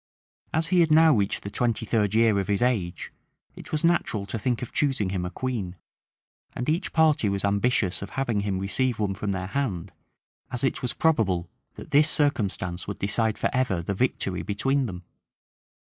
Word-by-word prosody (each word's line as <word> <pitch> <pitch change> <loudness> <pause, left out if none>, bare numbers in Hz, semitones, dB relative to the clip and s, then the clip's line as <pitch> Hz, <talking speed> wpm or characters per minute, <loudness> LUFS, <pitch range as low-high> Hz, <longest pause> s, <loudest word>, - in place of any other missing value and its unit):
As 160 +1 +1
he 180 - +3
had 165 -2 +4
now 160 0 +7
reached 100 -2 -1
the 100 - -6
twenty 115 -1 0
third 105 -2 +1
year 110 -3 +4
of 95 - -2
his 100 +3 +1
age, 105 -9 -1 0.4
it - - -11
was 155 0 -1
natural 165 -12 +1
to 110 +3 -4
think 125 +2 -1
of 125 - -7
choosing 130 -10 0
him 90 -2 -2
a - - -4
queen; 100 -3 -4 0.8
and 125 - -4
each 165 +5 0
party 155 -9 +3
was 100 0 -1
ambitious 100 -1 +1
of 100 - -6
having 120 -6 0
him 100 -2 -1
receive 115 +6 0
one 105 -2 -1
from 100 +1 -3
their 95 -1 -3
hand, 100 -7 -3 0.6
as 125 0 0
it 135 - 0
was 125 -2 -2
probable 95 - +1 0.2
that - - -11
this 150 +2 +5
circumstance 100 - 0
would 100 - -4
decide 110 +2 0
forever 125 -10 0
the 100 - -2
victory 95 -4 -1
between 135 +6 0
them. 90 -3 -7
110 Hz, 185 wpm, -26 LUFS, 100-130 Hz, 0.8 s, now